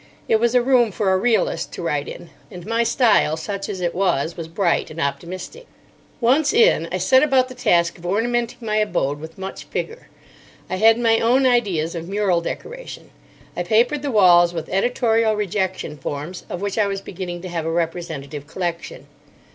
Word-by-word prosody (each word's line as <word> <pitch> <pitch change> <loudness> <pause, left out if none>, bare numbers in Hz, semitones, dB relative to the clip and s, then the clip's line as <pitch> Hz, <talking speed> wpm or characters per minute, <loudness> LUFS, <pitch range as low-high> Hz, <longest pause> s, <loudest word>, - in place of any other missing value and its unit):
It 220 - +4
was 235 +2 +1
a 245 - +4
room 245 -3 +3
for 195 -1 0
a - - +3
realist 235 +1 0
to - - -6
write - - -1
in; - - -9 0.2
and 180 -5 -10
my 230 +2 0
style, 230 - +3
such 195 +4 -5
as 190 - -5
it 175 -1 -1
was, 170 -4 0
was 165 -2 -6
bright 170 +1 0
and 160 - -9
optimistic. 185 - -5 0.5
Once 275 +5 +3
in, 465 +2 +3
I - - -1
set 260 -1 +4
about 265 -3 +3
the - - -8
task 170 -9 +1
of 170 - -13
ornamenting 235 +4 0
my 215 -1 0
abode 170 -9 0
with 160 +1 -10
much 190 0 -7
vigour. 460 +2 -5 0.6
I 185 - -1
had 225 +3 +5
my 230 -1 +3
own 255 +4 +3
ideas 195 -11 +1
of 170 0 -6
mural 195 -4 +1
decoration. - - -7 0.4
I - - -2
papered 230 +10 +2
the 285 - -3
walls 175 -6 +5
with 165 - -5
editorial 225 +1 +1
rejection 190 -6 -3
forms, 150 +7 -6
of 180 - -5
which 200 +2 -2
I 210 - +3
was 195 -1 -3
beginning 175 -2 -7
to 185 - -6
have 165 -2 -3
a - - -1
representative 160 -4 -4
collection. 170 0 -5
195 Hz, 185 wpm, -21 LUFS, 170-235 Hz, 0.6 s, had